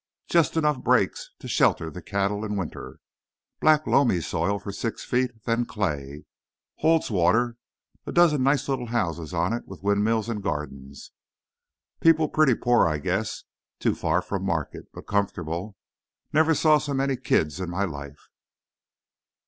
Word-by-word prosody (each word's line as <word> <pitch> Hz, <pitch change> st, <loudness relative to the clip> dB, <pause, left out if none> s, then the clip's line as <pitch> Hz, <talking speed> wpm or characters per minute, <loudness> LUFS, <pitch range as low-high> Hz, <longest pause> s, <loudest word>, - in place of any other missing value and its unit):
Just 170 Hz, -1 st, +2 dB
enough 150 Hz, -4 st, +1 dB
brakes -, -, +1 dB
to -, -, -10 dB
shelter -, -, +2 dB
the -, -, -8 dB
cattle 100 Hz, +1 st, -1 dB
in 105 Hz, -1 st, -3 dB
winter. 90 Hz, -5 st, -6 dB, 0.6 s
Black 155 Hz, 0 st, +4 dB
loamy 120 Hz, -10 st, +3 dB
soil 85 Hz, +4 st, -1 dB
for 100 Hz, -, -7 dB
six 110 Hz, +3 st, -4 dB
feet, 125 Hz, +1 st, +1 dB
and 115 Hz, -2 st, -28 dB
then 115 Hz, +1 st, +1 dB
clay. 75 Hz, -8 st, -3 dB, 0.5 s
Holds 160 Hz, -4 st, +2 dB
water. 115 Hz, +6 st, +2 dB, 0.5 s
A -, -, -3 dB
dozen 165 Hz, -5 st, +4 dB
nice 135 Hz, +2 st, +2 dB
little 130 Hz, -3 st, -2 dB
houses 85 Hz, -9 st, -2 dB
on 90 Hz, +4 st, 0 dB
it, 120 Hz, -, -4 dB
with 95 Hz, -1 st, -11 dB
windmills 105 Hz, +2 st, +1 dB
and 110 Hz, -3 st, -3 dB
gardens. 70 Hz, -5 st, -6 dB, 0.9 s
People 160 Hz, -1 st, +4 dB
pretty 155 Hz, -6 st, +3 dB
poor, 120 Hz, -4 st, +3 dB
I 75 Hz, -2 st, 0 dB
guess—too 95 Hz, +8 st, -3 dB
far 85 Hz, +3 st, 0 dB
from 100 Hz, -1 st, -3 dB
market—but 85 Hz, -6 st, -4 dB
comfortable. 95 Hz, -1 st, -2 dB, 0.6 s
Never 160 Hz, +1 st, +4 dB
saw 155 Hz, 0 st, +4 dB
so 145 Hz, -2 st, -3 dB
many 135 Hz, 0 st, +1 dB
kids 75 Hz, -, 0 dB
in 90 Hz, -2 st, -3 dB
my 95 Hz, +3 st, -1 dB
life." 70 Hz, -4 st, -9 dB
105 Hz, 150 wpm, -25 LUFS, 85-135 Hz, 0.9 s, Black